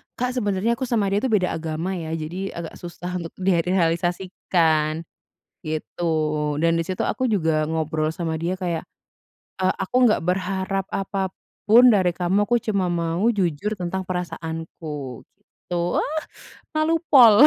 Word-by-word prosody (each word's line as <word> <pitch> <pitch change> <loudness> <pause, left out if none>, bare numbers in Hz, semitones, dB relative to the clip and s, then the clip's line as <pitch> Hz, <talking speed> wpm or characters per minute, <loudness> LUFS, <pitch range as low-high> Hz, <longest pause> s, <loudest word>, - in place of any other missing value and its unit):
Kak, 250 +1 -1
sebenernya 230 -1 0
aku 260 - -1
sama 210 -5 +1
dia 200 - +3
itu 260 - 0
beda 200 -7 +2
agama 160 +2 -3
ya. 165 -3 -3
Jadi, 170 +5 -4
agak 170 -1 -7
susah 180 +1 -5
untuk 165 -1 -7
direalisasikan, 175 -3 +1 0.6
gitu 155 +2 -4 0.6
dan 165 0 +3
disitu 175 +2 -2
aku 260 - -1
juga 160 -9 +2
ngobrol 155 0 -1
sama 165 -1 -2
dia 170 +3 -1
kayak, 170 -3 -2 0.7
eee, 185 0 +2
"Aku 220 - -2
nggak 215 - +3
berharap 190 +2 -1
apapun 195 +5 +3
dari 185 -5 +3
kamu, 185 +4 +1
aku 240 +1 +2
cuma 200 -4 0
mau 170 +3 0
jujur 190 +2 0
tentang 185 0 -3
perasaanku," 160 -6 -5
gitu, 175 0 -4
wah! 310 +1 -1 0.5
Malu 315 +1 +2
pol. 245 -1 +9
180 Hz, 135 wpm, -23 LUFS, 165-200 Hz, 0.7 s, pol